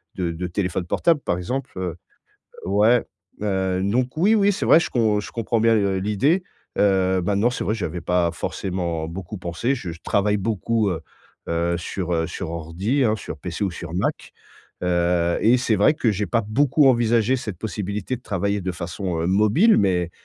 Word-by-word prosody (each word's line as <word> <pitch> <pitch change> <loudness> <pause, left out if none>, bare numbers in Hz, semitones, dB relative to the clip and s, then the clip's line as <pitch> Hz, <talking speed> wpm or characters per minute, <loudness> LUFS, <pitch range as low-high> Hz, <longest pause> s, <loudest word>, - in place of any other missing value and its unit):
de 90 -3 -1
de 90 +2 -4
téléphone 90 0 -2
portable, 155 - +2
par 85 - -1
exemple, 125 +9 -4
heu 90 -4 -3 0.7
ouais, 105 +5 +3 0.4
heu, 95 -2 0
donc 125 +5 0
oui, 205 +7 +4
oui, 205 -1 +4
c'est - - -3
vrai, 165 - +7
je - - -2
com 110 -4 +2
je - - -9
comprends 115 0 -1
bien, 115 0 +4
heu, 100 -3 +1
l'idée, 135 - +1 0.4
heu, 95 -2 +3
maintenant, 100 +5 +2
c'est 125 - -4
vrai 110 - +1
que 115 - -4
j'avais 85 -1 -3
pas 85 0 +1
forcément 85 -2 -3
beaucoup 95 +4 -7
pensé. 90 +10 -1
Je 90 -10 -6
je 85 - -10
travaille 105 +1 +1
beaucoup, 110 +1 0
heu 85 -5 -3 0.5
heu, 85 +1 0
sur, 90 +1 -3
heu, 80 -1 +1
sur 90 -4 -5
ordi, 85 - -1
hein, 110 -2 +2
sur - - -7
PC 90 +3 -3
ou 95 - 0
sur 85 0 -8
Mac, 90 - -2 0.5
heu 85 -1 +1
et 120 +3 +5
c'est 120 -3 +1
vrai 105 +10 +4
que 120 -6 0
j'ai 105 +1 -1
pas 115 - +1
beaucoup 140 +4 +3
envisagé 120 0 +3
cette 105 -8 -6
possibilité 105 +2 -3
de - - -22
travailler 100 -2 -1
de 90 0 -2
façon, 85 0 -4
heu, 85 - 0
mobile, 110 - +4
mais, 90 -3 +1
100 Hz, 195 wpm, -23 LUFS, 90-115 Hz, 0.7 s, vrai